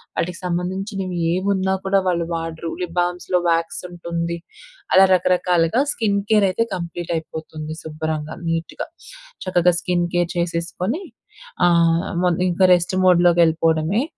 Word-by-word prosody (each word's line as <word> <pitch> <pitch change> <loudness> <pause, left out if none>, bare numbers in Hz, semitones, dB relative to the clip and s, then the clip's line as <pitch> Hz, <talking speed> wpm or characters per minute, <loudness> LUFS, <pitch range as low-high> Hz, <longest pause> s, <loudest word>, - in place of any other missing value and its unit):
వాటికి 175 0 -2
సంబంధించినివి 185 +1 -3
ఏమున్నా 190 +1 0
కూడా 195 0 +3
వాళ్ళు 170 -2 +1
వాడరు. 165 0 -4
లిప్ 175 -2 -4
బామ్స్‌లో 180 +1 0
వ్యాక్సుంటుంది. 170 0 -2 0.5
అలా 190 +1 +7
రకరకాలుగా 180 +3 +2
స్కిన్ 205 -3 0
కేరయితే 205 +1 +3
కంప్లీటయిపోతుంది 160 -2 -5
శుభ్రంగా, 155 0 -4
నీట్‌గా. 165 0 -3 0.6
చక్కగా 180 -1 +3
స్కిన్ 180 -1 0
కేర్ 175 -1 +1
చేసేసుకొని, 175 - -2 0.7
ఆహ్, 170 -1 +3 0.2
మొన్ 180 -1 +2
ఇంక 175 +2 -3
రెస్ట్ 175 +1 -2
మోడ్‌లోకెళ్ళిపోడమే. 170 +2 +3
175 Hz, 105 wpm, -21 LUFS, 165-185 Hz, 0.7 s, అలా